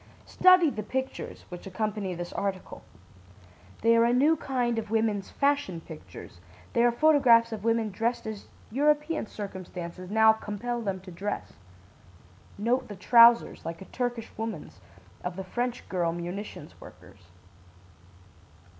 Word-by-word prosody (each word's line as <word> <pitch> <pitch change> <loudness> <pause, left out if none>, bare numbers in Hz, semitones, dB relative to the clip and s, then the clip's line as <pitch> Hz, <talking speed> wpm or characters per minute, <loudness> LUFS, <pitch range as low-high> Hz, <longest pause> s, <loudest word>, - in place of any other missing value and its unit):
"Study 365 -4 +5
the 215 - -4
pictures 260 +5 -5
which 180 +1 -9
accompany 200 -1 -3
this 175 0 -6
article. 195 -2 -4 1.0
They 230 0 +5
are 230 - +5
a 235 - +3
new 290 +6 +4
kind 245 -5 -1
of 220 -1 -7
women's 220 -3 0
'fashion 280 - 0
pictures'; 95 - -12 0.3
they 235 - +3
are 240 - +5
photographs 240 -4 +5
of 215 -2 -6
women 230 -1 +1
dressed 230 +5 -2
as 215 -2 -7 0.2
European 300 +2 +1
circumstances 185 -3 -7
now 220 +1 +6
compel 220 +3 -4
them 195 -4 -3
to 185 0 -11
dress. 200 +4 -5 1.0
Note 235 +5 0
the 205 - -8
trousers, 235 +4 +5
like 165 0 -6
a 190 - -10
Turkish 245 -2 -3
woman's, 220 - -6 0.4
of 180 0 -4
the 190 - -5
French 245 +4 -3
girl 175 -3 0
munitions 175 -1 -7
workers. 90 0 -15
220 Hz, 135 wpm, -28 LUFS, 185-240 Hz, 1.0 s, now